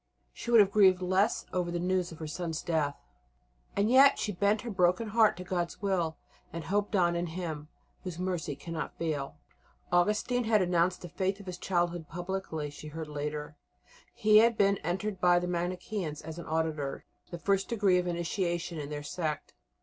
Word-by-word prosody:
She - - -7
would 235 -1 +7
have 200 -1 +3
grieved 190 -3 +5
less 190 +4 +1
over 180 -1 0
the 175 - -2
news 180 0 0
of 165 - -9
her 160 - -6
son's 165 +1 -4
death. 155 -4 0 0.8
And 200 +1 +2
yet 270 +4 +7
she 210 - -2
bent 200 +3 +1
her 240 - -5
broken 185 +3 +2
heart 220 -3 +4
to 180 - -6
God's 175 -2 -3
will, 180 -5 0 0.3
and 165 -1 -5
hoped 205 +3 0
on 175 -2 +3
in 170 0 -1
Him 160 -3 -5 0.4
"Whose 180 -3 -5
Mercy 175 -5 -2
cannot 160 +3 -6
fail." 150 -4 -3 0.6
Augustine 210 +7 +2
had 220 -1 +4
renounced 180 -1 +1
the - - -5
Faith 190 +1 -1
of 200 - -11
his 180 -1 -6
childhood 175 -3 -1
publicly, 175 -4 -4
she 150 +1 -10
heard 155 0 -6
later; 150 0 -4 0.5
he 215 0 +4
had 230 0 +4
been 200 0 +4
entered 190 +3 -3
by 175 0 +5
the 175 - 0
Manicheans 180 -1 -3
as 160 +1 -7
an - - -8
"auditor," 155 -3 -2 0.2
the 175 - -6
first 195 +2 0
degree 200 -6 +3
of 180 - -2
initiation 170 -1 -2
in 145 -1 -5
their 145 -1 -5
sect. 155 0 -4
175 Hz, 185 wpm, -30 LUFS, 160-195 Hz, 0.8 s, would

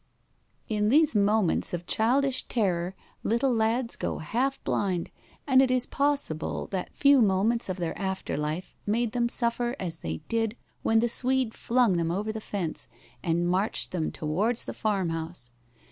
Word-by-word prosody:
In 210 -1 +1
these 305 +1 +4
moments 205 -4 +2
of 175 0 -7
childish 260 +7 +1
terror 185 -5 0 0.3
little 245 +4 +1
lads 230 +2 +1
go - - -3
half 255 - -1
blind, 185 -4 -1 0.3
and 265 -2 +5
it 265 - +3
is 255 -1 +4
possible 280 - -1
that 185 -2 -4
few 280 -2 +6
moments 215 +3 +2
of 185 - -2
their 170 -3 -3
after 190 -1 -3
life 155 +5 -3
made 230 +2 +1
them 235 0 0
suffer 240 +1 -1
as 165 -3 -4
they 80 0 -4
did 225 0 -1 0.2
when 225 0 +3
the 240 - +2
Swede 255 0 +2
flung 235 -6 +2
them 165 -1 0
over 205 +5 -1
the 220 0 -6
fence 190 -7 -4 0.3
and 170 0 0
marched 190 +5 0
them 165 -4 -1
towards 200 +10 0
the - - -5
farm 200 -6 0
house. 165 -6 -6
215 Hz, 160 wpm, -27 LUFS, 175-240 Hz, 0.3 s, few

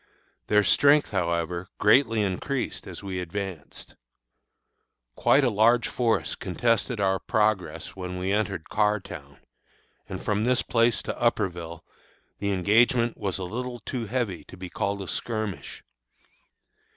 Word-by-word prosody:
Their 105 0 +4
strength, 145 +5 +4
however, 85 -1 -1
greatly 115 0 +4
increased 115 +8 -3
as - - -8
we 95 -2 -4
advanced. 90 -3 -6 1.2
Quite 140 - +4
a 130 - +4
large 115 +3 +4
force 120 -2 0
contested 115 +4 0
our 95 -1 +2
progress 105 -4 -1
when 90 -1 -5
we 95 +1 -2
entered 100 -5 -1
Carrtown, 100 -10 -2 0.7
and - - -5
from 105 +1 +1
this 125 +1 +2
place 115 -3 +2
to - - -5
Upperville 85 -8 -1 0.6
the 100 0 -1
engagement 115 +5 +3
was 100 -3 -3
a 95 - -4
little 120 +6 -4
too 120 -1 -5
heavy 115 -6 -2
to 95 - -12
be 90 0 -8
called 100 0 -2
a - - -9
skirmish. 110 -2 -4
105 Hz, 130 wpm, -26 LUFS, 95-115 Hz, 1.2 s, Their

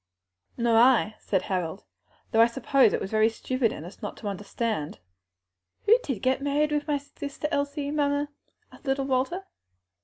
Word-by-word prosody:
"Nor 235 -1 +3
I," 235 -3 +5
said 190 - 0
Harold; 185 0 -3 0.5
"though 225 - +5
I 230 - +7
suppose 265 0 +3
it - - 0
was 190 - -5
very 220 0 +4
stupid 245 +1 -1
in 155 - -7
us 180 - -12
not - - -5
to 210 - -6
understand." 205 -3 -3 0.9
"Who 440 - +7
did 260 - -4
get 260 +1 +2
married 290 +2 +1
with 295 0 -1
my 295 -1 +2
sister 285 +1 -6
Elsie, 285 0 -1
mamma?" 290 -1 +1 0.4
asked - - -17
little 270 0 0
Walter. 270 +9 0
260 Hz, 165 wpm, -27 LUFS, 220-285 Hz, 0.9 s, I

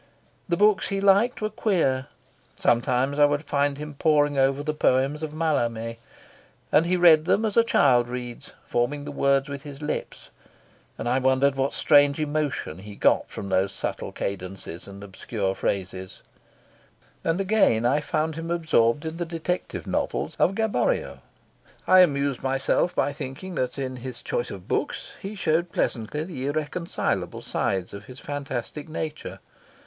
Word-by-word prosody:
The 170 - +1
books 210 0 +4
he 195 - -2
liked 200 +5 +3
were 215 - -1
queer; 135 -11 +1 0.5
sometimes 125 +4 +1
I 145 - +8
would 145 +1 0
find 145 -1 0
him 150 0 -7
poring 145 0 +2
over 135 +1 +2
the 155 0 -1
poems 140 +1 +1
of 155 -1 -4
Mallarme, 120 -8 -1 0.7
and 165 +3 +4
he 180 +1 +2
read 160 -3 +6
them 205 +5 +2
as 210 - -1
a 230 - +6
child 125 - +4
reads, 120 -1 -7
forming 145 +4 -1
the 145 - -5
words 140 0 +2
with 140 -1 -6
his 145 -2 -9
lips, 150 - -5 0.7
and - - -4
I 125 +2 +2
wondered 130 +1 +3
what 135 0 -1
strange 145 -1 +4
emotion 150 - -2
he 105 +1 -10
got - - +2
from 100 - -6
those 95 +1 +2
subtle - - -4
cadences 95 -3 -6
and 100 0 -10
obscure 100 0 -3
phrases; 95 -1 -4 1.0
and 165 +3 0
again 195 - +3
I 135 +5 +3
found 155 +1 -1
him 165 +2 -6
absorbed 155 -6 +2
in 160 +1 -4
the 175 - -1
detective 170 +2 -3
novels - - -2
of 190 - +3
Gaboriau. 220 - 0 0.7
I 185 - +7
amused 140 -6 +3
myself 135 +6 +1
by 145 - +1
thinking 135 +8 -7
that 125 -5 -2
in 130 -2 -4
his 125 +1 -7
choice - - -2
of - - -9
books - - -2
he 205 0 -6
showed 170 -1 0
pleasantly 125 +6 -1
the 145 -6 -5
irreconcilable 155 +4 -2
sides 95 -2 -2
of 100 +1 -8
his 130 +3 -11
fantastic 145 0 -5
nature. 155 -1 -5
145 Hz, 160 wpm, -25 LUFS, 125-165 Hz, 1.0 s, I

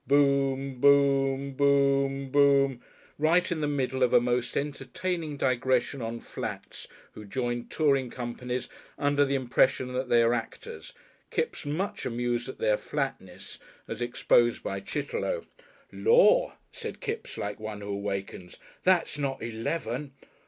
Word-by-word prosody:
"Boom.... 135 -2 +2
Boom.... 140 -1 +4
Boom.... 140 -1 +2
Boom.... 140 -2 +4 0.4
right 165 +4 +3
in 160 -2 -1
the 150 - +1
middle 130 -2 -1
of 125 - +3
a - - +8
most 120 0 -1
entertaining 150 +3 -3
digression 130 0 +1
on 115 +1 -4
flats - - -7 0.2
who 105 - -10
join 120 +3 -3
touring 140 -5 +1
companies 125 +1 -4 0.3
under 145 0 +2
the 140 0 0
impression 130 0 +1
that 130 0 -2
they 120 -1 +5
are 115 +1 +3
actors, 450 - -6 0.4
Kipps 450 - -2
much 175 +8 -2
amused 120 +1 -2
at - - -7
their 105 -1 +2
flatness 135 -11 -5 0.3
as 115 +1 -6
exposed 120 0 +2
by 95 - -3
Chitterlow. 145 - -3 0.5
"Lor'!" - - +4 0.2
said 460 -2 -7
Kipps 440 +2 -5
like 105 +1 -4
one 110 -1 -6
who 100 - -7
awakens, 100 -2 -4 0.3
"that's 175 -5 +2
not 135 -4 -2
eleven!" 120 +4 -3
135 Hz, 135 wpm, -28 LUFS, 120-145 Hz, 0.5 s, a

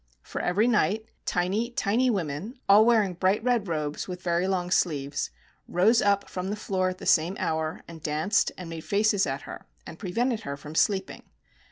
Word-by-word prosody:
For - - -5
every 200 +6 +2
night, 220 -2 +2 0.2
tiny, 195 +6 0
tiny 240 +2 +1
women 190 - -3
— - - -43
all 210 +3 +7
wear 230 -3 +5
ing 190 -2 -3
bright 190 +4 +1
red 240 -5 +1
robes 150 -3 -3
with 180 -1 -7
very 175 +1 +1
long 180 -2 -1
sleeves, 145 -7 0 0.2
— - - -37
rose 215 +7 +3
up 200 0 +2
from 185 +1 -4
the 205 - -1
floor 185 -3 -1
at 185 - -6
the - - -9
same 170 +4 +3
hour, 160 0 -2
and 165 -1 -10
danced, 155 +8 +1
and 180 - -7
made 165 -1 -6
faces 205 -2 +2
at 135 +1 -3
her - - -10 0.2
and 160 - -10
prevented 230 +5 -1
her 140 -10 -6
from 150 +2 -10
sleeping. 190 +4 0
185 Hz, 200 wpm, -27 LUFS, 165-215 Hz, 0.2 s, all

